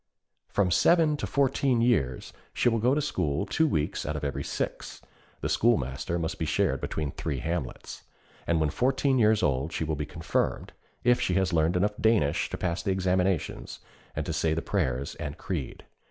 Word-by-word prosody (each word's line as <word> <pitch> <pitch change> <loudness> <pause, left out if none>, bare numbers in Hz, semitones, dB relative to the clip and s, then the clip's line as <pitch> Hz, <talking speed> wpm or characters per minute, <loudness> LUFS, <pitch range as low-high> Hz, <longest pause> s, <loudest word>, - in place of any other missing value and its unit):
From 95 -3 +1
seven 160 - +4
to - - -3
fourteen 135 -2 +2
years 110 - +1 0.2
she - - +3
will 115 -1 0
go 125 +5 +3
to 150 - +1
school 75 - -1
two 160 0 +2
weeks 75 - -1
out - - -3
of - - -4
every 70 - -2
six - - -4 0.4
(the - - -1
schoolmaster 85 - +1
must 80 -2 -3
be 80 - -1
shared 95 +4 +1
between 75 -3 -3
three 75 0 -3
hamlets), 80 -1 -4 0.5
and 85 -1 +2
when 75 -2 +1
fourteen 130 +1 +1
years 110 -1 +4
old, 70 +2 +1
she 80 - -2
will 80 0 -1
be 75 0 -4
confirmed, 80 +1 -2 0.3
if 120 0 +4
she 90 - +1
has 95 -1 +1
learned 80 +2 +2
enough 105 +3 +1
Danish 110 -11 +2
to - - -4
pass 85 -1 -2
the - - -3
examinations 95 -2 0 0.4
and - - -2
to - - -3
say 80 -1 +1
the 80 - -2
prayers 70 -9 -1
and 70 - -5
creed. 90 -9 -5
90 Hz, 185 wpm, -28 LUFS, 75-115 Hz, 0.5 s, seven